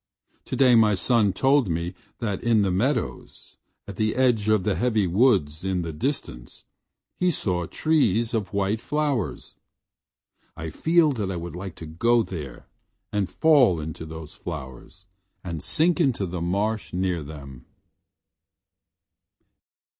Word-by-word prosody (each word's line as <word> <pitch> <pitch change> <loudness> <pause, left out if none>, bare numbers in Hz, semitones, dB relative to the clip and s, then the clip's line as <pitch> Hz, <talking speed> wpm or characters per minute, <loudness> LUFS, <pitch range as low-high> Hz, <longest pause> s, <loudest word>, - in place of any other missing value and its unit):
Today 130 -3 +3
my 110 -3 +5
son 105 +3 +2
told 135 +3 +2
me 85 +2 -2 0.2
that 105 -5 -3
in 115 -3 +3
the 95 - +1
meadows, 120 +7 -2 0.3
at 100 -2 -8
the 110 0 0
edge 120 -5 +2
of 110 -3 +3
the 105 - +1
heavy 110 -2 +1
woods 90 - +2
in 95 -2 -1
the 80 -1 -5
distance, 75 - -5 0.6
he 180 - +3
saw 90 - -1
trees 120 - +1
of 105 -5 -2
white 100 +2 0
flowers. 135 - -2 1.0
I 80 0 -5
feel 165 -2 +3
that 105 -7 -3
I 95 - -3
would 85 -1 -6
like 95 0 -7
to 80 - -9
go 115 +10 +2
there 75 - -8 0.5
and 100 -4 -1
fall 125 - +4
into 80 +1 -6
those 80 -1 -9
flowers 80 +2 -9 0.4
and 85 -4 -5
sink 170 +3 +1
into 130 -10 +1
the 90 -1 -5
marsh 100 +5 -1
near 90 -2 -1
them. 70 -4 -10
100 Hz, 140 wpm, -25 LUFS, 85-120 Hz, 1.0 s, my